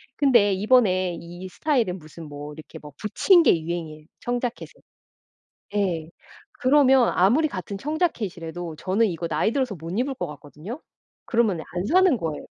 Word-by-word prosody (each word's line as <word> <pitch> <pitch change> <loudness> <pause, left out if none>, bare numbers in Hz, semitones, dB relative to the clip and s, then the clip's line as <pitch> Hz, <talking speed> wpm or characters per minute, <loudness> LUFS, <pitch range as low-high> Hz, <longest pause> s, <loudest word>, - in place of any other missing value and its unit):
근데 235 -8 +4
이번에 190 -4 +2
이 175 +2 -9
스타일은 230 - 0
무슨 155 0 -11
뭐 145 +1 -8
이렇게 155 +1 -11
뭐 150 - -12
붙인 345 - +4
게 170 - +4
유행이에요, 160 -2 -5 0.2
청자켓에. 245 0 -3 1.0
예. 170 -6 -1 0.5
그러면 265 -2 +5
아무리 250 - +3
같은 190 - -6
청자켓이라도 185 - -3
저는 195 +7 +1
이거 170 -1 -4
나이 165 +8 +1
들어서 255 -6 -1
못 165 0 -8
입을 270 +2 0
것 - - -4
같거든요. 150 - -9 0.5
그러면은 210 -9 +1
안 180 +1 -2
사는 370 -3 +4
거예요. 160 -7 -4
190 Hz, 340 characters per minute, -24 LUFS, 165-250 Hz, 1.0 s, 그러면